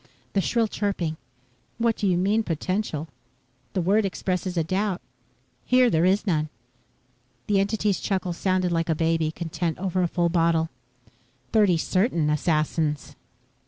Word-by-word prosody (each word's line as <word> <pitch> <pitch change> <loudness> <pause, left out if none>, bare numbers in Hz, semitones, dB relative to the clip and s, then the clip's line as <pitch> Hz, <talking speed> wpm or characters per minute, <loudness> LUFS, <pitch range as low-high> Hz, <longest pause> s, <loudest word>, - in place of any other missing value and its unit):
The 195 - +2
shrill 230 +4 +1
chirping: 190 -7 -2 0.6
"What 230 -1 +2
do 205 - -1
you 180 -2 +3
mean, 200 +5 +2
potential? 170 -2 -2 0.7
The 185 - 0
word 200 +5 +3
expresses 185 -1 -2
a 165 - +3
doubt. 190 +3 -1 0.6
Here 250 -1 +4
there 165 0 +3
is 195 +4 +2
none." 155 -5 0 1.0
The 205 -2 +2
entity's 205 0 +1
chuckle 185 -3 -1
sounded 185 0 0
like 165 0 0
a 160 - +2
baby, 165 0 +1
content 165 0 -3
over 185 -1 -1
a 175 - +2
full 170 0 +1
bottle. 165 -1 +2 0.8
"Thirty 205 -6 +4
certain 170 - +1
assassins." 150 -1 0
180 Hz, 140 wpm, -25 LUFS, 165-200 Hz, 1.0 s, Here